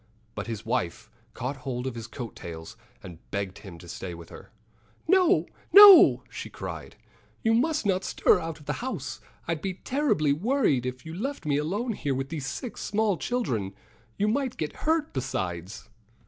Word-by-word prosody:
But - - -5
his 115 -1 -5
wife 90 -6 -2 0.2
caught 130 +3 -4
hold 130 -1 -4
of 130 - -2
his 115 -1 -7
coat 120 -5 -7
tails 80 -1 -8 0.3
and 85 -3 -10
begged 100 -1 -4
him 95 -5 -11
to 85 - -13
stay 85 +1 -6
with 85 -1 -12
her. - - -12 0.6
"No! 370 0 +4 0.3
no!" 405 -2 +10
she - - -7
cried. - - -7 0.5
"You 225 - +3
must 295 +4 +1
not 190 -1 +1
stir - - +3
out 165 -2 -5
of 150 - -16
the - - -1
house. 260 +1 -5 0.3
I'd 165 -2 -2
be 190 0 -3
terribly 220 - +1
worried 175 - +1
if 125 +2 -6
you 160 - -7
left 250 - -4
me 145 -2 +1
alone 205 +11 -1
here 145 -8 -2
with 135 +1 -3
these 150 -4 -4
six 235 - -6
small 215 -1 +1
children. 230 - -1
And 95 0 -7 0.4
you 205 - +1
might 255 +3 -1
get 155 - -3
hurt, 320 -1 +1
besides." 95 -8 -4
150 Hz, 180 wpm, -27 LUFS, -, 0.6 s, no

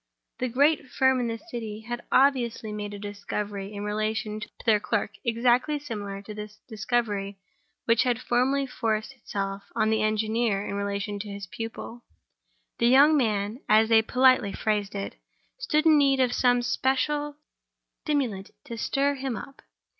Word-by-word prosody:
The 255 - 0
great 285 +4 +2
firm 265 0 +3
in 245 - 0
the 230 0 -3
City 225 -7 -7
had 240 +2 -5
obviously 240 -5 +2
made 205 -1 -5
a - - -7
discovery 205 0 -5
in 205 -1 -6
relation 215 0 -2
to 210 - -7 0.2
their 220 -3 +4
clerk, 210 0 -1
exactly 245 +4 +2
similar 205 -8 -6
to 210 - -8
the 210 0 -7 0.2
discovery 210 -3 -2 0.5
which 230 -1 +4
had 245 -2 +1
formerly 260 +3 +1
forced 225 -2 -2
itself 200 -5 -4
on 220 0 +2
the 220 0 +2
engineer 215 -1 0
in - - -4
relation 200 0 -3
to 205 +1 -6
his 200 0 -6
pupil. 225 +4 -7 0.8
The 235 - +4
young 280 +5 +6
man, 215 -3 0
as 220 +1 +5
they 225 -1 +6
politely 250 -3 +3
phrased 205 -2 -1
it, 200 0 -5 0.4
stood 310 -10 +1
in 310 -2 +6
need 275 -1 +3
of 250 -2 +2
some 245 -1 +3
special 290 +4 0 0.7
stimulant 250 -11 -1
to 235 -5 -7
stir 280 +5 +1
him 265 -3 -3
up. 275 +6 -9
225 Hz, 160 wpm, -26 LUFS, 210-260 Hz, 0.8 s, young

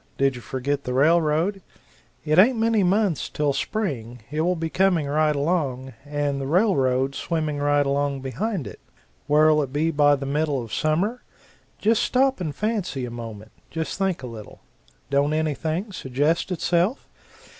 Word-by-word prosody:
Did 135 0 +2
you 120 - -8
forget 140 +3 -3
the 125 - -2
railroad? 165 +6 +2 0.6
It 155 +3 +3
ain't 235 +5 +6
many 225 -1 +2
months 190 -2 +1
till 145 -2 0
spring; 125 - -3
it 155 +1 -1
will 180 +2 +1
be 165 -1 -2
coming 180 -2 +2
right 150 +1 +1
along, 140 -4 -1
and 145 -1 -2
the 135 - -3
railroad 135 - +2
swimming 155 -1 -2
right 145 0 +2
along 140 0 0
behind 180 - -3
it. 100 - -9 0.5
Where'll 150 +1 +4
it 135 -3 -4
be 155 +3 +1
by 145 -1 +4
the 135 0 -5
middle 145 0 0
of 115 - -10
summer? 185 +11 0 0.6
Just 220 +1 +2
stop 265 -4 +2
and 155 -5 -3
fancy 195 - -2
a 120 - -7
moment 110 -2 -8 0.2
just 160 +3 -4
think 190 -7 -1
a - - -4
little 115 -4 -10 0.5
don't 140 +2 +2
anything 160 +5 -1
suggest 150 +3 -1
itself? 180 - 0
150 Hz, 160 wpm, -24 LUFS, 140-180 Hz, 0.6 s, ain't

